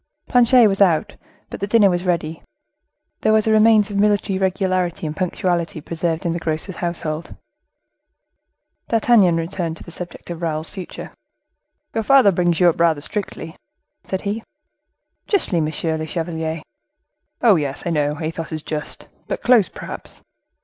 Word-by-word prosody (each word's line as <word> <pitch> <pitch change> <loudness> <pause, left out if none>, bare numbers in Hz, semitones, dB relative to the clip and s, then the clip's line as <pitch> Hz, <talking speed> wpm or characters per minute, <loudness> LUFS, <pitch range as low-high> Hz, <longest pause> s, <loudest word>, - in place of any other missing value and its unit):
Planchet 245 -1 +5
was 195 0 -1
out, 170 -5 +3 0.4
but - - -6
the 200 - -2
dinner 210 -1 +5
was 180 -1 0
ready. 165 -3 -1 0.8
There 215 - +2
was 215 -1 +3
a 220 - +2
remains 215 -1 +5
of 200 - -1
military 205 -2 +2
regularity 185 -3 0
and 155 0 -4
punctuality 175 -2 -1
preserved 165 +2 -3
in 170 - +1
the 170 - -3
grocer's 160 +3 -3
household. 170 -2 -3 1.5
D'Artagnan 220 -6 +4
returned 165 -1 -3
to - - -11
the 170 - -11
subject 175 0 -6
of 170 0 -6
Raoul's 160 -1 -2
future. 190 -3 -8 0.8
"Your 225 - -1
father 260 -3 +6
brings 175 -2 +1
you 180 - +5
up 170 - +2
rather 165 -3 +3
strictly?" 165 -2 -5 0.5
said 190 - -3
he. 205 +3 -3 0.9
"Justly, 205 - +1
monsieur 160 +1 -1
le 155 0 -4
chevalier." 160 -1 -3 0.8
"Oh, 225 -5 +7
yes, 145 -4 -2
I 170 - -1
know 150 -1 0
Athos 165 0 -4
is 155 -1 -4
just; 150 -1 -5 0.2
but - - -4
close, 240 -7 +5
perhaps?" - - -9
175 Hz, 155 wpm, -20 LUFS, 160-200 Hz, 1.5 s, Oh